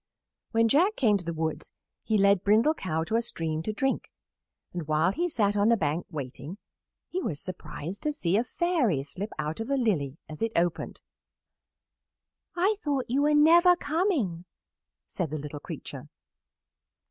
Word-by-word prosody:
When 230 -1 +3
Jack 355 - +3
came 215 -6 +3
to 185 - -8
the 170 - -3
woods 160 -1 -3 0.3
he 220 - +1
led 200 -1 +4
Brindle 220 +9 +4
Cow 160 - -2
to 220 +7 0
a - - +2
stream 160 -8 -2
to 215 - -2
drink, 265 +6 -1 0.6
and 170 -4 -5
while 155 +4 +2
he 345 - -1
sat 205 -8 +1
on 205 +2 +3
the 235 - +4
bank, 155 -1 -1
waiting, 145 +3 -6 0.5
he 370 - -3
was 150 - -3
surprised 180 0 -7
to 300 - 0
see 185 - 0
a 225 - +3
Fairy 255 - 0
slip 190 +9 -5
out 155 +3 -3
of 225 +3 -4
a 275 - +2
lily 160 - 0
as 155 -1 -9
it 225 0 0
opened. 170 0 -1 1.5
"I 390 +4 +2
thought 280 -4 -1
you 275 +3 +2
were 295 +1 +3
never 340 +4 +7
coming," 290 - -1 0.6
said 165 - -3
the 155 - -3
little 150 0 -6
creature. - - -8
205 Hz, 170 wpm, -28 LUFS, -, 1.5 s, never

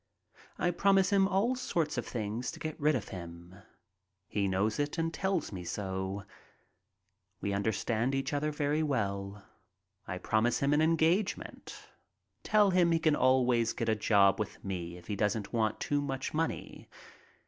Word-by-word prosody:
I 175 - +1
promise 195 +2 +3
him 195 -1 +4
all 200 +6 +2
sorts 175 - -1
of - - -3
things 115 +1 -3
to - - -10
get 155 +1 -5
rid 150 0 +3
of 110 -5 -4
him. 85 -1 -9 0.7
He 100 -1 0
knows 100 +5 0
it 145 +3 -1
and 165 0 -1
tells 190 -4 -1
me 90 -3 -6
so. 95 +2 -4 1.2
We 100 - -2
understand 110 +5 0
each 135 +1 -2
other 145 +1 0
very 150 +1 0
well. 100 -8 -2 0.6
I - - -3
promise 110 +3 +1
him 140 +1 +1
an 150 - +3
engagement. 165 +5 0 0.6
Tell 210 -2 +4
him 175 -2 +4
he 165 - +4
can 155 -2 +2
always 125 -3 +3
get - - -2
a 110 - +3
job 100 -2 +4
with 105 - -5
me 90 -3 -4
if 90 - -14
he 105 - -3
doesn't 105 0 -1
want 110 -2 0
too 145 0 0
much 135 -2 -3
money. 160 +1 -3
130 Hz, 160 wpm, -31 LUFS, 100-160 Hz, 1.2 s, him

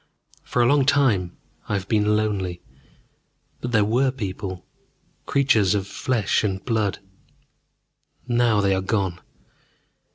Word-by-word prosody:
For 120 - 0
a - - +3
long 140 +3 +4
time 110 -12 +2 0.3
I - - -1
have 95 -1 -3
been 105 -1 +2
lonely, 95 -5 -2 1.0
but 125 - -4
there 105 -3 +3
were 125 +5 +2
people, 95 -6 -5 0.6
creatures 115 -8 +3
of 100 -2 -1
flesh 110 0 0
and 95 -2 -2
blood. 110 -5 0 1.3
Now 120 -3 +2
they 100 -1 +2
are 95 - 0
gone. 95 -3 -1
105 Hz, 125 wpm, -23 LUFS, 95-120 Hz, 1.3 s, long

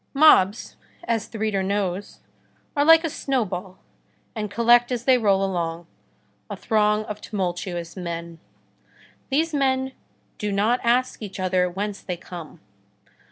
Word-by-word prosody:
Mobs, 235 -9 +4 0.3
as 230 -9 -1
the 225 - -9
reader 210 -2 0
knows, 195 0 -2 0.5
are 285 - +3
like 325 +2 +7
a - - 0
snowball, 195 -11 -2 0.6
and 210 -2 -4
collect 235 +4 +4
as 240 -1 -2
they 255 -2 +5
roll 195 -3 +2
along, 170 -3 -3 0.6
a - - -5
throng 210 -1 +1
of 210 0 -7
tumultuous 175 -4 -4
men. 170 -2 -6 0.9
These 315 +4 +1
men 265 -2 +1 0.5
do 210 -1 -2
not 215 +5 +2
ask 245 +2 +1
each 200 -2 -7
other 185 -1 +1
whence 200 +3 -4
they 180 -2 -5
come. 175 -2 -10
205 Hz, 135 wpm, -24 LUFS, 185-240 Hz, 0.9 s, like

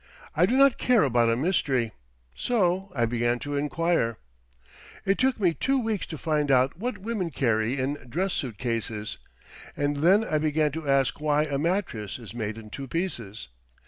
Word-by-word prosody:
I 175 +4 +4
do 255 - +2
not 275 -2 +5
care 245 -6 +4
about 120 -4 +3
a 115 - +3
mystery. 135 - +1 0.4
So 190 - 0
I 120 -3 +2
began 120 +1 0
to 145 0 -3
inquire. 145 -4 0 0.9
It 195 +1 +2
took 260 -2 +2
me 180 -5 +3
two 270 +9 +1
weeks 220 -5 -2
to 160 - -6
find 150 -2 0
out 130 0 +3
what 240 +8 -3
women 205 -4 -3
carry 120 -3 0
in 140 +3 -2
dress 185 +8 -1
suit 120 -7 -3
cases. 115 -3 -3 0.6
And 145 0 0
then 185 +9 +5
I 155 -8 0
began 155 0 +1
to 155 -1 -5
ask 135 +1 +2
why 150 0 +2
a 145 -2 -2
mattress 160 - -1
is 115 -5 -10
made 110 -2 -4
in 110 -2 -11
two 135 +3 -6
pieces. 120 - -4
145 Hz, 175 wpm, -26 LUFS, 120-180 Hz, 0.9 s, not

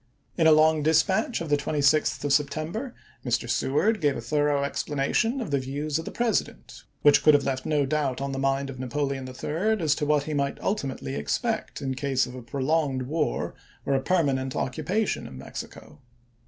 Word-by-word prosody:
In 165 -2 +4
a - - +7
long 155 0 +5
dispatch 185 +8 +2
of 165 - -4
the 145 - +3
26th 145 +1 +1
of 145 -1 +1
September, 155 - -1 0.3
Mr. 120 -1 0
Seward 150 - +1
lm, - - -16
gave 145 -3 +2
a - - -4
thorough 145 -2 +1
explanation 145 - 0
of 225 - -4
the 140 - +2
views 145 +3 -2
of 160 - -6
the - - -5
President, 235 -4 -2 0.2
which 145 - +6
could 155 - +6
have 140 - +2
left 130 -1 -2
no 150 -2 +2
doubt 140 -2 -1
on 140 0 -3
the 135 - -3
mind 135 0 0
of 130 - -10
Napoleon 135 +1 -2
III. 175 +12 -1
as 155 -4 +2
to 150 -1 -2
what 150 -1 +3
he 155 - -4
might 140 -1 0
ulti 170 -10 -1
mately 70 - -6
expect 70 - -2
in 135 -1 -1
case 135 -1 0
of 125 - -9
a 130 - -8
prolonged 135 +2 0
war 150 +4 -1 0.3
or 140 - +1
a 135 - +2
permanent 135 -5 0
occupation 195 +11 -1
of 65 - -10
Mexico. 70 +2 -9
145 Hz, 195 wpm, -26 LUFS, 135-160 Hz, 0.3 s, a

